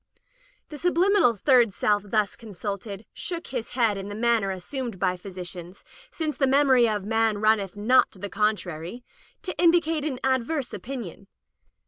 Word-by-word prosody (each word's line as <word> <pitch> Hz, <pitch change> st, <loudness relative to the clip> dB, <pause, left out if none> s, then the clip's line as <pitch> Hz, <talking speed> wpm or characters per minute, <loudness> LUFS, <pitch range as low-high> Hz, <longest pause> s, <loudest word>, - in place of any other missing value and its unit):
The 300 Hz, -2 st, -8 dB
subliminal 355 Hz, -, +3 dB
third 240 Hz, +1 st, +4 dB
self 205 Hz, +1 st, +1 dB
thus 210 Hz, -1 st, 0 dB
con 225 Hz, -3 st, -12 dB
sulted, 200 Hz, +2 st, -5 dB
shook 340 Hz, -1 st, -5 dB
his 240 Hz, -3 st, -4 dB
head 220 Hz, -5 st, +2 dB
in 195 Hz, -, -6 dB
the 205 Hz, -, -6 dB
manner 230 Hz, -3 st, +2 dB
as 185 Hz, -2 st, -5 dB
sumed 255 Hz, -7 st, -4 dB
by 185 Hz, 0 st, 0 dB
physicians, 180 Hz, -1 st, -9 dB, 0.3 s
since 310 Hz, -2 st, -3 dB
the 270 Hz, -, +2 dB
memory 260 Hz, -3 st, +4 dB
of 210 Hz, -2 st, -2 dB
man 225 Hz, 0 st, +1 dB
runneth 210 Hz, -2 st, +1 dB
not 240 Hz, +5 st, +4 dB
to -, -, -11 dB
the 205 Hz, +2 st, -5 dB
contrary, 200 Hz, -1 st, -2 dB, 0.4 s
to 365 Hz, -, -4 dB
indicate 330 Hz, -3 st, +3 dB
an 275 Hz, -5 st, -3 dB
adverse 265 Hz, +2 st, 0 dB
opinion. 235 Hz, -7 st, -7 dB
225 Hz, 160 wpm, -25 LUFS, 200-265 Hz, 0.4 s, third